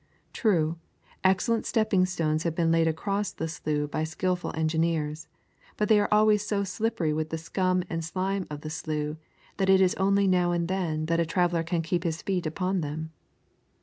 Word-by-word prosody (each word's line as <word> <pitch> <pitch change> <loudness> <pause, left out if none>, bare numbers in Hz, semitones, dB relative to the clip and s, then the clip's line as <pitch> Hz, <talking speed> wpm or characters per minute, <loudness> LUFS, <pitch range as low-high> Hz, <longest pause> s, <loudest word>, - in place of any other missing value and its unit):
True, 170 -7 +1 0.4
excellent 190 +5 +2
stepping 200 -5 +2
stones 155 -4 0
have 165 -1 -2
been 165 -1 +2
laid 165 0 +3
across 200 +5 -1
the 160 - -4
slough 150 -2 -2
by 155 - -1
skilful 175 +3 -2
engineers, 160 -1 -1 0.5
but 210 - 0
they 215 -1 +6
are 205 - +1
always 210 0 +4
so 210 -1 0
slippery 190 -5 -1
with 155 0 -2
the 160 - -3
scum 185 +2 0
and 165 -1 -3
slime 190 +3 -2
of 150 -1 -6
the 155 - -6
slough, 155 -1 -3 0.4
that 195 -1 +1
it 190 0 +6
is 185 -1 +4
only 200 +1 +3
now 180 -2 +3
and 170 -1 0
then 170 -4 -1
that 165 +1 +1
a - - +4
traveller 175 0 +1
can 165 0 -1
keep 170 +2 -1
his 165 -2 -2
feet 185 -4 -1
upon 185 +3 -1
them. 155 +2 -4
170 Hz, 185 wpm, -27 LUFS, 160-190 Hz, 0.5 s, they